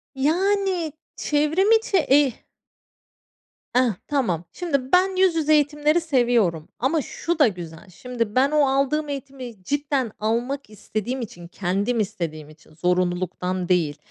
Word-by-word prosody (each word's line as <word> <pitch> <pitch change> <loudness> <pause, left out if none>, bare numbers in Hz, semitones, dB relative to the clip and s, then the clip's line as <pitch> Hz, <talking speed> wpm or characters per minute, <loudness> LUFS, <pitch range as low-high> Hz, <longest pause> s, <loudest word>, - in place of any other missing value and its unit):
Yani, 360 +3 +1 0.2
çevrim 310 +8 +1
içi 445 -3 +3
eğ 285 -4 +4 1.4
Eh, 250 - +6 0.3
tamam. 220 - 0
Şimdi, 280 -7 -2
ben, 375 +1 +4
yüz 370 -2 +3
yüze 310 -1 +2
eğitimleri 295 +2 +2
seviyorum 240 - +1
ama 290 +6 +1
şu 335 +5 -3
da 290 - +7
güzel. 175 -1 -7
Şimdi 230 +3 -4
ben, 270 +3 +4
o 300 -2 +4
aldığım 280 +3 +1
eğitimi 260 -7 -7
cidden 280 -1 -1
almak 240 +5 -2
istediğim 215 +4 -4
için, 175 -7 -8
kendim 200 +6 -1
istediğim 165 -7 -4
için, 155 0 -19
zorunluluktan 180 +1 -1
değil 160 -5 +1
260 Hz, 130 wpm, -23 LUFS, 185-300 Hz, 1.4 s, da